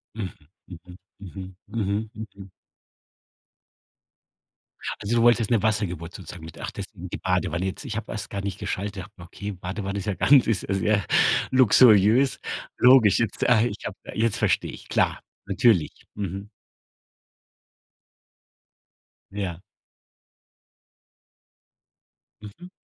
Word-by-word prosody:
Mhm, 100 -5 -4 0.4
mhm, 90 0 -12 0.2
mhm, 95 -1 -9
mhm, 105 0 -2
mhm. 100 -3 -10 2.5
Also, 110 +4 -1
du 115 - +3
wolltest 120 -2 +4
'ne 115 -4 +2
Wassergeburt 95 -6 -1
sozusagen 90 -3 -10
mit 80 - -10
ach - - -5
deswegen 95 -2 -8
die - - -5
Badewanne 90 -1 -1
jetzt. 95 +9 -5
Ich 115 -4 -5
habe 110 0 -5
erst 105 -1 -5
gar 100 -1 -4
nicht 100 -1 -5
geschaltet. 100 -1 -4
Habe 100 +3 -15
gedacht: 85 -1 -13
„Okay, 105 0 -5
Badewanne 95 +2 -5
ist 95 - -6
ja 100 - +1
ganz 135 +5 +5
ist 110 -5 0
ja 100 - -2
sehr 100 0 +1 0.5
luxuriös.“ 120 0 +5 0.4
Logisch, 125 -5 +6
jetzt 115 -3 -1
ah, 115 -3 +5
ich 110 -3 -2
habe 100 - -5 0.2
jetzt 115 -1 0
verstehe - - +1
ich, - - -13
klar, - - +1 0.3
natürlich, 100 -4 +1
mhm. 100 0 -5 2.8
Ja. 95 -4 -4 2.8
Mhm. 135 - -11
100 Hz, 125 wpm, -25 LUFS, 95-110 Hz, 2.8 s, Logisch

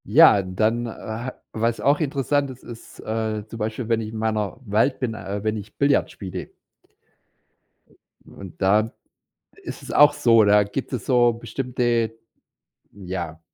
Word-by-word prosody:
Ja, 100 - +7
dann, 110 +6 0
ha 115 +2 -6 0.2
was 115 +1 0
auch 145 +2 +3
interessant 140 -1 0
ist, 130 -1 -11
ist, 115 -1 -12
äh, 110 -1 -3
zum 115 +1 -9
Beispiel, 110 +2 -3
wenn 115 -1 +2
ich 110 - -5
in 110 - -7
meiner 110 -2 -1
Welt 110 +6 +1
bin 125 -4 -2
äh, 100 -1 -5
wenn 110 0 0
ich 105 0 -10
Billard 140 0 +2
spiele. 95 -3 -7 1.7
Und 95 -1 -12
da 105 +4 +3 0.7
ist - - -8
es - - -10
auch 150 0 +7
so, 115 -2 +5
da 105 0 +5
gibt 105 +9 -5
es 120 -6 -4
so 120 -2 +4
bestimmte, 120 -1 -1 0.7
hm, 100 -2 -12
ja 85 -3 -5
110 Hz, 155 wpm, -23 LUFS, 105-120 Hz, 1.7 s, Ja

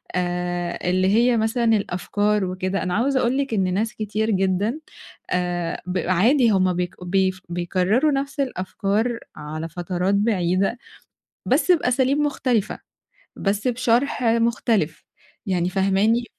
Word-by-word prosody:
آآ 175 -1 -2
اللي 185 +1 +2
هي 235 +4 +3
مثلًا 225 +2 0
الأفكار 205 -1 +1
وكده، 185 +1 -2
أنا 180 -1 -2
عاوزة 260 +6 +1
أقول 250 +1 +1
لِك 275 -3 -1
إن 190 -3 +1
ناس 215 +4 -1
كتير 215 +1 -2
جدًا 195 - 0 0.5
آآ 175 -2 -2
ب 180 +1 -2
عادي 230 +7 +4
هُم 185 -2 +2
بيك 180 0 -3
بي 190 +1 +2 0.2
بيكرروا 185 - +1
نفس 275 +1 -3
الأفكار 225 -1 -1 0.2
على 155 +2 -6
فترات 180 +3 -1
بعيدة 195 0 +1 0.7
بس 365 - +3
بأساليب 265 -3 +2
مختلفة، 255 -7 0 0.6
بس 205 +4 -1
بشرح 250 +2 +1
مختلف 230 -7 +1 0.4
يعني 180 -2 0
فاهماني، 195 +5 +2
200 Hz, 125 wpm, -22 LUFS, 180-235 Hz, 0.7 s, عادي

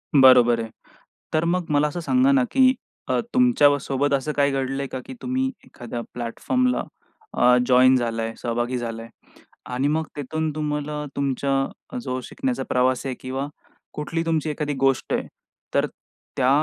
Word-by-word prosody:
बरोबर 125 -3 +7
आहे. 115 - -5 0.6
तर 155 +1 +2
मग 175 0 0
मला 145 +1 +3
असं 160 +4 -5
सांगा 255 +10 +3
ना 270 -2 +4
की 260 -1 +5 0.4
अ, - - +2
तुमच्यासोबत 145 - +3
असं 140 +2 0
काही 140 -1 +3
घडलंय 135 0 -2
का 130 - -4
की - - -8
तुम्ही 260 +1 0 0.2
एखाद्या 120 0 -7
प्लॅटफॉर्मला 250 - 0 0.5
अ, 125 0 +5
जॉइन 130 +1 +6
झालाय, 115 -2 -1
सहभागी 120 +1 -1
झालाय. 115 -1 -5 0.6
आणि 130 +3 -1
मग 155 +2 0
तिथून 155 +2 -2
तुम्हाला 150 0 -3
तुमच्या 140 0 -1 0.4
अ, - - -3
जो 130 - -3
शिकण्याचा 265 -3 -3
प्रवास 130 0 +1
आहे 130 -2 -2
किंवा 130 +2 -4 0.5
कुठली 165 +2 -2
तुमची 160 -2 0
एखादी 150 -1 -2
गोष्ट 135 -2 +1
आहे. - - -1 0.5
तर - - +3 0.5
त्या 130 -1 +3
140 Hz, 150 wpm, -23 LUFS, 125-160 Hz, 0.6 s, बरोबर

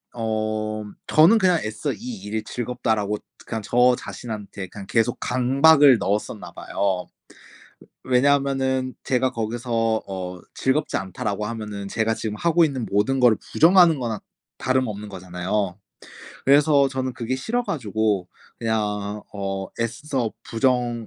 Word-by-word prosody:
어 110 -1 -2 0.2
저는 170 +9 +6
그냥 180 -5 +3
애써 110 0 -3
'이 - - -10 0.3
일이 110 +1 -3
즐겁다.'라고 110 -4 -2 0.3
그냥 110 -1 -4
저 125 +3 +4
자신한테 105 -6 -7
그냥 100 +1 -10
계속 115 +1 +1
강박을 135 +1 +5
넣었었나 105 +2 -2
봐요. 95 -3 -2 1.0
왜 130 - -5
왜냐하면은 135 -1 +2
제가 130 0 +1
거기서 120 +2 -4 0.4
어 90 -2 -5
'즐겁지 135 - 0
않다.'라고 100 +3 -3
하면은 105 -3 -5
제가 110 +2 0
지금 110 -1 -4
하고 170 +6 +3
있는 135 -6 -2
모든 125 +7 +1
거를 120 -3 +5 0.2
부정하는 170 -2 +6
거나 115 -4 -3 0.4
다름없는 110 -6 -1
거잖아요. 95 +1 -3 0.7
그래서 140 0 +5
저는 130 -1 -3
그게 120 +2 -2
싫어 235 - -1
가지고 110 - -1 0.3
그냥 105 -2 -2
어 95 -1 -4
애써 120 0 -2
부정 120 -1 0
115 Hz, 290 characters per minute, -23 LUFS, 105-130 Hz, 1.0 s, 저는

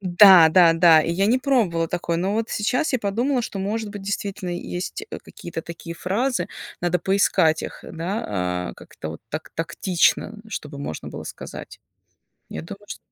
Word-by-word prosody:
Да-да-да, 175 -3 +7
и 165 - -2
я 195 +4 +1
не 240 +4 +3
пробовала 220 - +1
такое. 170 -1 -2
Но 190 +4 0
вот 225 +1 -1
сейчас 255 +8 0
я 255 - +2
подумала, 240 +6 0
что, 200 - -5
может 210 +2 -2
быть, 205 - -7
действительно 195 -1 -4
есть, 175 - -4
э, - - -5
какие-то 165 -1 -7
такие 170 0 -8
фразы, 235 +10 -1 0.3
надо 175 0 +1
поискать 165 -4 +2
их, - - -7
да, 100 - -3
а, - - -11
как-то 80 - -9
вот 80 - -9
так 155 +4 -6
тактично, 170 +5 +1
чтобы 150 -8 -6
можно 80 - -5
было - - -8
сказать. - - -9 0.7
Я 80 - -5
думаю, 200 - -10
чт - - -6
180 Hz, 165 wpm, -23 LUFS, 165-205 Hz, 0.7 s, Да-да-да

